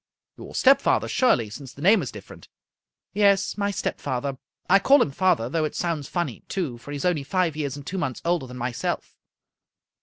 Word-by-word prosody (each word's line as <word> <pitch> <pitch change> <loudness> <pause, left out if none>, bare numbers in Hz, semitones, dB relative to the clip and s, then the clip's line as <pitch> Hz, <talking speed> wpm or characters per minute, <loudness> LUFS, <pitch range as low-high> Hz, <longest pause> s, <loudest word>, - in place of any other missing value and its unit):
" - - -66
Your - - -10
stepfather, 270 +1 +4
surely, 120 - +2
since 130 +4 -9
the 140 - -13
name 200 +2 +5
is 135 - -5
different." 105 -2 -12 0.4
" - - -67 0.3
Yes, 200 -1 +3
my 205 -1 -1
stepfather. 135 -8 -3 0.3
I 195 +2 +6
call 275 +8 +5
him 155 - +2
father, 170 -6 +2
though 160 +5 -1
it 155 - -3
sounds 165 -5 -2
funny, 175 -1 -3
too, 150 -11 -3
for 130 - -13
he 145 - -4
is 140 - -4
only 175 -5 +1
five 180 0 0
years 145 -3 -3
and 145 - -10
two 190 +4 -4
months 130 -7 -2
older 170 -6 0
than 125 0 -9
myself." 120 0 -3
155 Hz, 205 wpm, -24 LUFS, 130-190 Hz, 0.4 s, I